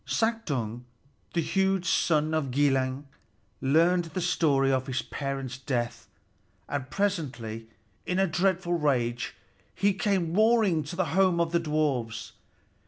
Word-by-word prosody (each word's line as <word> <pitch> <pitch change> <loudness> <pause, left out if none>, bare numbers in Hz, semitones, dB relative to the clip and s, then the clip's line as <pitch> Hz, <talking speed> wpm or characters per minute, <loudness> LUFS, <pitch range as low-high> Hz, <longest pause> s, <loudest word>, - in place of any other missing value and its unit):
Suttung, 145 - -1 0.5
the 170 - +3
huge 190 0 +1
son 155 -2 +2
of 155 -4 0
Gilling, 135 0 +1 0.5
learned 170 +6 +3
the 165 +3 -5
story 145 -6 +2
of 130 0 0
his 130 -1 -2
parents' 135 -2 -4
death, 120 -3 -3 0.6
and 140 -2 -4
presently, 125 - -2 0.4
in 180 - 0
a 195 - +4
dreadful 180 +1 0
rage, 125 -7 0 0.4
he 200 +1 +2
came 190 -5 0
roaring 215 -5 +4
to 150 - -6
the 185 0 +1
home 185 -2 +3
of 170 -1 +1
the 170 - +2
dwarfs. 150 -8 -1
155 Hz, 130 wpm, -28 LUFS, 130-185 Hz, 0.6 s, a